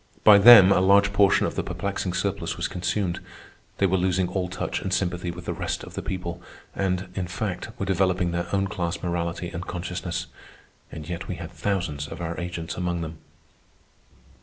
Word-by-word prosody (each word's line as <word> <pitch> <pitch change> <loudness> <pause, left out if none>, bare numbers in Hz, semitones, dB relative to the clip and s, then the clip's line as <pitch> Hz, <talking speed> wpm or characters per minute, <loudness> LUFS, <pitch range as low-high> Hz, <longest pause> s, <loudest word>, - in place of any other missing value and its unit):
By 105 -2 +9
them 100 -3 +10
a 95 - +4
large 100 +1 +4
portion 100 -1 +4
of - - -2
the - - -1
perplexing - - -3
surplus - - -2
was - - -1
consumed. 90 0 -2 0.6
They 100 - +2
were 95 0 +2
losing 90 0 +1
all 90 -1 -2
touch 90 - -3
and 95 - -4
sympathy 90 -2 -1
with 85 0 -7
the - - -2
rest - - -3
of - - -10
the - - -4
people, 85 -2 -5 0.3
and, 95 -1 -1
in 95 -1 -3
fact, 90 +1 -4
were 100 - -2
developing 95 -2 +1
their 85 0 -2
own 100 0 +1
class 85 -2 -3
morality 85 0 -2
and 85 +2 -6
consciousness. 90 -1 -4 0.7
And 75 -1 -8
yet 85 0 -5
we - - -3
had - - -8
thousands 85 -8 -2
of 80 +3 -8
our 85 -1 -3
agents 85 -2 -4
among 90 -1 -2
them. 80 -1 -6
90 Hz, 185 wpm, -25 LUFS, 85-95 Hz, 0.7 s, them